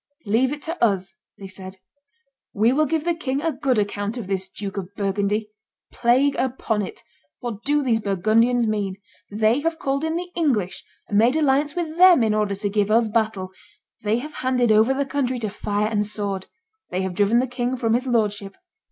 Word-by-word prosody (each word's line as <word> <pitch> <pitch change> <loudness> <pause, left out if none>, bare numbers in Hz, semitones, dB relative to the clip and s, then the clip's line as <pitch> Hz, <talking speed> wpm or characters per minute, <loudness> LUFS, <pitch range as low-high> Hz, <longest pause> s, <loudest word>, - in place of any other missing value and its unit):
"Leave 235 +6 +2
it 295 0 -6
to 330 -3 -3
us," 195 -3 +1 0.2
they 195 - -9
said: 190 0 -10 0.8
"we 220 +4 +3
will 305 +2 +2
give 320 +1 0
the 345 +1 +1
king 275 -5 -2
a 325 +2 0
good 260 -5 0
account 205 +2 -2
of 235 - -5
this 190 -1 -3
Duke 200 -2 -6
of 195 0 -6
Burgundy. 205 +1 -1 0.4
Plague 260 +4 +3
upon 240 -4 -1
it! 195 - -7 0.4
what 230 -4 -5
do 290 +1 +1
these 235 -4 +2
Burgundians 220 +5 +2
mean? 205 -3 -1 0.3
They 220 +4 +2
have 325 +2 -1
called 275 0 -1
in 320 0 -1
the 355 +1 -4
English 250 - 0 0.2
and 205 - +2
made 240 +5 +4
alliance 290 -1 +2
with 330 -2 -3
them 360 -7 +7
in 220 -1 +2
order 210 -2 0
to 205 +1 -2
give 205 0 0
us 225 +1 +3
battle; 215 -4 -1 0.5
they 215 +1 +1
have 300 +5 -6
handed 250 -3 +2
over 220 +4 +5
the 275 +1 0
country 265 -2 -1
to 220 -4 -3
fire 210 0 -1
and 215 -1 0
sword; 205 -2 -3 0.4
they 185 +1 -2
have 190 -1 -3
driven 205 +4 +3
the 250 - +3
king 245 0 -2
from 230 -2 +1
his 250 +3 0
lordship. 205 -4 0
225 Hz, 195 wpm, -23 LUFS, 205-265 Hz, 0.8 s, them